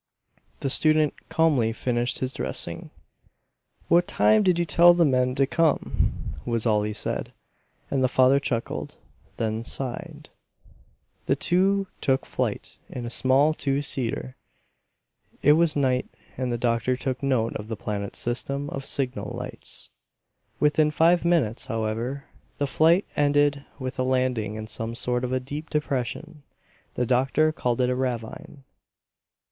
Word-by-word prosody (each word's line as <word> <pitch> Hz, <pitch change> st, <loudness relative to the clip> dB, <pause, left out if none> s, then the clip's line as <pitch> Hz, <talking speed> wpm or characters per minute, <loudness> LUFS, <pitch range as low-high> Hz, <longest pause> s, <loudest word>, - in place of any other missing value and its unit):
The 135 Hz, -, -1 dB
student 155 Hz, 0 st, +4 dB, 0.2 s
calmly 145 Hz, -9 st, +2 dB
finished 120 Hz, +1 st, -1 dB
his 130 Hz, 0 st, -2 dB
dressing. 65 Hz, 0 st, -4 dB, 1.0 s
"What 175 Hz, +1 st, +4 dB
time 215 Hz, 0 st, +4 dB
did 185 Hz, -4 st, +3 dB
you 175 Hz, -, +1 dB
tell 175 Hz, +1 st, +6 dB
the 170 Hz, -1 st, +4 dB
men 125 Hz, -2 st, +2 dB
to 135 Hz, -, +3 dB
come?" 160 Hz, +2 st, 0 dB
was 115 Hz, -1 st, -1 dB
all 105 Hz, -2 st, +3 dB
he 105 Hz, +1 st, -2 dB
said; 105 Hz, -, -3 dB, 0.6 s
and 135 Hz, -2 st, +1 dB
the -, -, +4 dB
father 130 Hz, +2 st, +4 dB
chuckled, 120 Hz, -4 st, -4 dB, 0.4 s
then 110 Hz, 0 st, -2 dB
sighed. 125 Hz, +1 st, -4 dB, 1.0 s
The -, -, +3 dB
two 195 Hz, +2 st, +2 dB, 0.2 s
took 135 Hz, -1 st, +1 dB
flight -, -, -3 dB
in 125 Hz, -, -6 dB
a 120 Hz, -, -5 dB
small 135 Hz, +5 st, +3 dB
two 140 Hz, -1 st, -1 dB
seater. 130 Hz, -1 st, -3 dB, 1.1 s
It 145 Hz, -, +6 dB
was 165 Hz, -1 st, +2 dB
night, 130 Hz, -3 st, +1 dB, 0.3 s
and 130 Hz, -1 st, -2 dB
the 120 Hz, -, -1 dB
doctor 115 Hz, +1 st, 0 dB
took 130 Hz, -1 st, -3 dB
note 130 Hz, -5 st, 0 dB
of 105 Hz, -, -5 dB
the 110 Hz, -1 st, -5 dB
planet's 100 Hz, -1 st, -4 dB
system 140 Hz, +4 st, -2 dB
of 135 Hz, -, -5 dB
signal 130 Hz, -2 st, -2 dB
lights. -, -, -7 dB, 0.7 s
Within 150 Hz, +1 st, +3 dB
five 165 Hz, +3 st, +3 dB
minutes, 160 Hz, -11 st, +1 dB
however, 115 Hz, +5 st, -3 dB, 0.3 s
the 145 Hz, -, 0 dB
flight 165 Hz, +7 st, +3 dB
ended 145 Hz, -1 st, +2 dB
with 130 Hz, -1 st, -5 dB
a -, -, +2 dB
landing 125 Hz, -5 st, 0 dB
in 110 Hz, 0 st, -5 dB
some 115 Hz, +1 st, -5 dB
sort 125 Hz, +1 st, -1 dB
of 125 Hz, -, -2 dB
a 130 Hz, -, +1 dB
deep 145 Hz, +5 st, -7 dB
depression; 150 Hz, +2 st, -3 dB, 0.5 s
the 125 Hz, -, 0 dB
doctor 135 Hz, +6 st, +2 dB
called 125 Hz, -5 st, -1 dB
it 125 Hz, -1 st, +2 dB
a -, -, 0 dB
ravine. 130 Hz, +4 st, -4 dB
130 Hz, 145 wpm, -25 LUFS, 120-150 Hz, 1.1 s, tell